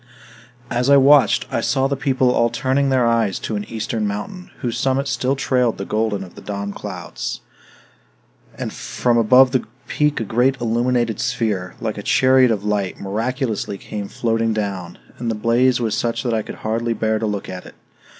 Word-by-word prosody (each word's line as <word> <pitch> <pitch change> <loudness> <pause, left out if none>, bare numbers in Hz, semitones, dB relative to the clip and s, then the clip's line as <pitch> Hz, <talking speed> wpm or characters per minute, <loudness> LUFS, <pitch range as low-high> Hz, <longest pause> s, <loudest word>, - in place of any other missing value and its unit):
As 125 +3 +1
I 140 - +8
watched, 140 0 +5
I - - 0
saw 135 - +1
the 140 +1 0
people 130 -2 +1
all 115 -1 +2
turning 135 +2 0
their 130 -2 +3
eyes 115 -5 +1
to 110 - -3
an 105 0 -3
eastern 110 -1 -3
mountain, 105 - -5
whose 120 -2 -2
summit 135 +1 +1
still 135 0 0
trailed 125 -3 +1
the 100 - -4
golden 105 -2 -1
of 90 - -12
the - - -12
dawn 100 0 -4
clouds. - - -6 1.2
And - - -4
from 120 -1 0
above 125 +3 +6
the 130 -2 +1 0.2
peak 150 0 +1
a - - -1
great 125 +5 +1
illuminated 120 -1 0
sphere, 105 -7 -1
like 110 -2 -3
a - - -4
chariot 130 +3 +4
of 105 -3 -1
light, 105 -3 -1
miraculously 110 0 -2
came 105 0 -6
floating 115 0 0
down; 95 -5 -4 0.2
and 120 -1 -2
the 115 - -1
blaze 120 +3 +2
was 110 -3 0
such 115 +3 -1
that 120 -3 -1
I 110 - +1
could - - -8
hardly 115 +2 0
bear 110 -1 0
to 110 - -1
look 105 -2 -3
at 90 -1 -7
it. - - -14
115 Hz, 190 wpm, -20 LUFS, 105-130 Hz, 1.2 s, I